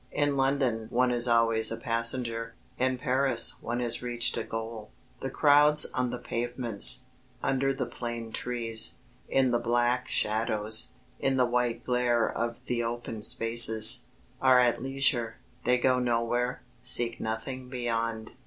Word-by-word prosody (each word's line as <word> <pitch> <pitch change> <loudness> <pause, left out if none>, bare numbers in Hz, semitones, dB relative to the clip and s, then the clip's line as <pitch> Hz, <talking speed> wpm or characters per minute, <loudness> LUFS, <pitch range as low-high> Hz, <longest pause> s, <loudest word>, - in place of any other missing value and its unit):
In 145 -1 0
London 135 -5 -1
one 125 +1 +1
is 120 0 +1
always 115 -1 +3
a 115 - -3
passenger, 115 -1 -1 0.2
in 130 0 0
Paris 130 -1 +1
one 120 +1 -4
has 120 -1 -2
reached 120 -1 0
a - - -3
goal. 115 -1 -7 0.3
The 135 - -5
crowds 150 +2 +4
on 125 -1 -1
the 125 - -5
pavements, 120 +1 +1 0.4
under 135 0 0
the 135 -1 -3
plane 120 -2 -7
trees, 115 -2 +2 0.3
in 130 -2 +2
the 120 - +1
black 120 +1 0
shadows, 110 0 +1 0.3
in 135 -1 0
the 125 - +3
white 120 -1 -2
glare 120 -2 0
of 115 0 -5
the 120 -1 -2
open 115 -1 -6
spaces, 115 0 +5 0.3
are 130 -1 +5
at 120 -2 +1
leisure 130 -3 -1 0.3
they 125 +1 +3
go 125 0 +1
nowhere, 120 0 -2 0.2
seek 120 -1 +1
nothing 125 +4 -5
beyond. 115 -3 -3
120 Hz, 145 wpm, -27 LUFS, 115-125 Hz, 0.4 s, spaces